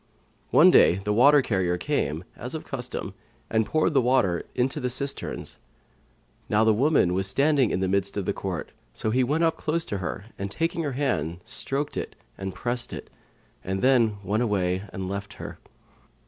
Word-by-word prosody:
One - - +7
day - - +6
the 100 +2 -2
water 140 +5 +6
carrier 90 -6 0
came, 90 - -1
as 125 +6 -6
of 160 - -6
custom, 125 -7 -5 0.4
and 110 -1 +2
poured 155 +3 +1
the 135 - +4
water 120 -9 +1
into 130 +2 0
the 125 - -1
cisterns. 140 +3 -3 0.9
Now 105 +1 +3
the 110 -1 +5
woman 125 - +3
was 95 +1 +1
standing 140 +2 +3
in 95 - -1
the 95 - +1
midst 100 +1 0
of 100 - -2
the 100 - 0
court; 95 -5 -4 0.2
so 110 - -1
he 130 +3 +3
went 150 +6 +1
close 165 +2 -1
up - - -14
to 100 - -1
her 95 +2 -4
and 100 0 -3
taking 165 +8 -1
her 145 -4 -2
hand, 90 - -1
stroked 145 +2 -2
it - - -4 0.2
and 95 -1 -6
pressed 120 0 -2
it, - - -8 0.5
then 110 +2 +2
went 105 +4 0
away 95 -4 0
and 95 -1 -5
left 100 +1 -5
her. - - -8
110 Hz, 180 wpm, -26 LUFS, 95-135 Hz, 0.9 s, One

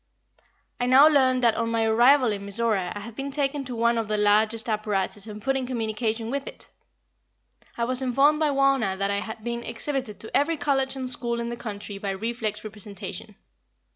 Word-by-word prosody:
I 245 - 0
now 265 +4 +8
learned 260 -4 +3
that 230 -2 +5
on 230 +1 -1
my 230 -1 +1
arrival 240 +3 +5
in 200 -1 -4
Mizora 200 -2 0
I 205 - -5
had 225 +2 -9
been 275 +3 -4
taken 280 0 -1
to 250 -1 -6
one 235 0 +2
of 225 - -3
the 215 0 -1
largest 215 +2 +2
apparatus 210 -1 -1
and 210 -1 -7
put 270 +5 -1
in 260 -2 -2
communication 225 -1 -2
with 280 +1 -3
it. - - -7 1.1
I 235 - -1
was 255 +2 +4
informed 275 +4 +3
by 310 -1 +2
Wauna 275 -8 +2
that 200 +1 -1
I 200 - 0
had 220 0 -7
been 235 0 -3
exhibited 235 -2 -4
to 220 - -7
every 315 +3 +2
college 275 -2 0
and 260 -1 -4
school 240 -1 -2
in 235 0 -3
the 235 - -4
country 205 -3 -7
by 200 - -3
reflex 215 +1 -3
representation. 210 -2 -7
235 Hz, 200 wpm, -25 LUFS, 215-265 Hz, 1.1 s, now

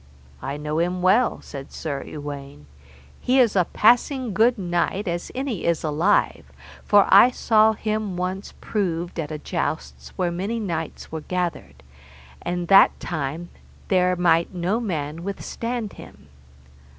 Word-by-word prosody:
I 140 +2 -4
know 150 +1 -2
him 180 +1 -1
well, 210 +7 +3
said 135 -1 -9
Sir 145 -4 -4
Uwaine, 140 - -8 0.5
he 255 +2 +1
is 235 -5 +4
a 180 -3 +4
passing 245 - +2
good 230 +4 +3
knight 185 +2 -1
as 175 0 -3
any 255 -7 -3
is 170 -1 0
alive, 160 +6 +1 0.4
for 205 -1 +5
I 200 +6 +8
saw 220 -3 +3
him 215 -3 -3
once 185 +2 -4
proved 175 -4 -2
at 150 -2 -3
a 155 - -4
jousts 65 - -4
where 175 -1 0
many 195 +7 -3
knights 165 -7 -5
were 160 -1 -4
gathered, 160 - -4 0.6
and 175 0 -3
that 195 +1 +6
time 160 +1 -4 0.4
there 180 -1 +3
might 170 0 +2
no 180 +6 0
man 165 -7 -4
withstand 225 +3 -4
him. 75 - -14
180 Hz, 140 wpm, -23 LUFS, 160-210 Hz, 0.6 s, I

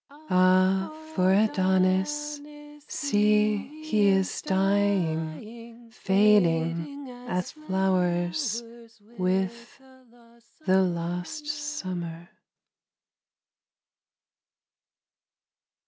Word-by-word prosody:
Ah, 185 +1 +3 0.2
for 185 -8 +3
Adonis! 190 +9 +1 0.5
See, 210 -5 +2 0.3
he 215 -10 +2
is 190 -1 +1
dying, 200 +4 -1
Fading 195 - +1 0.2
as 180 -5 -2
flowers 190 - -1 0.6
With 190 +8 -2 0.9
the 190 +1 +4
lost 175 - -3
summer. 185 - -5
190 Hz, 55 wpm, -26 LUFS, 180-230 Hz, 0.9 s, the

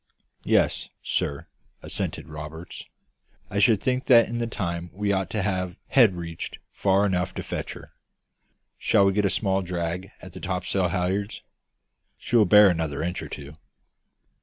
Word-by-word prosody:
"Yes, - - +2
sir," 70 +3 -1 0.4
assented - - -3
Roberts; 75 +2 -8 0.7
"I 100 - 0
should 105 0 +5
think 130 0 0
that 120 -3 +6
in 120 +1 -3
that 115 -1 -2
time 85 -6 -3
we 100 +2 -1
ought 95 -2 0
to 105 -1 -2
have 95 -2 -2
head 115 -8 +5
reached 85 -1 -6 0.2
far 100 +1 +2
enough 90 -1 -1
to - - -4
fetch - - -4
her. - - -13 0.9
Shall 100 - +4
we 95 - +3
get 105 +1 +1
a - - +3
small 95 -1 0
drag 90 +1 -3
at 90 -1 -12
the - - -8
topsail 90 +1 -1
halliards? 95 +3 -2 0.7
She - - -3
will 110 -3 +6
bear 105 +2 +8
another 80 -4 -1
inch 90 +2 -2
or - - -7
two." 75 +2 -9
95 Hz, 160 wpm, -25 LUFS, 85-100 Hz, 0.9 s, bear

